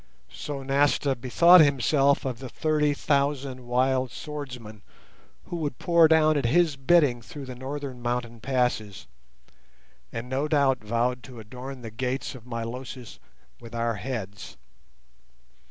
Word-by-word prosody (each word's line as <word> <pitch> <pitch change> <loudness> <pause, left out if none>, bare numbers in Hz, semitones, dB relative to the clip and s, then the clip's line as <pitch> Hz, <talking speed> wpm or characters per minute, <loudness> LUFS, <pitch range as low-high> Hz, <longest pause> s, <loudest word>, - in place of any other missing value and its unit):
So 140 - -6
Nasta 140 0 +2
bethought 170 +9 +6
himself 140 0 +3
of 125 -3 -3
the 130 -1 -7
thirty 150 0 +1
thousand 140 -3 -1
wild 130 +1 +1
swordsmen 125 -8 -8 0.6
who 175 - -5
would 145 -6 -3
pour 170 -2 +5
down 155 -1 +4
at 135 - -2
his 160 +3 +3
bidding 135 -3 +3
through 140 +5 -9
the 130 - -7
northern 130 0 -6
mountain 120 -1 -3
passes, 120 -6 -1 1.1
and 115 +1 -5
no 135 +4 -1
doubt 140 -5 +2
vowed 120 +3 0
to 125 -3 -11
adorn 125 +4 -9
the 115 - -7
gates 125 +4 -3
of 125 -2 -13
Milosis 120 0 -6 0.4
with 115 0 -11
our 115 -1 -1
heads. 100 -7 -6
130 Hz, 135 wpm, -26 LUFS, 120-145 Hz, 1.1 s, bethought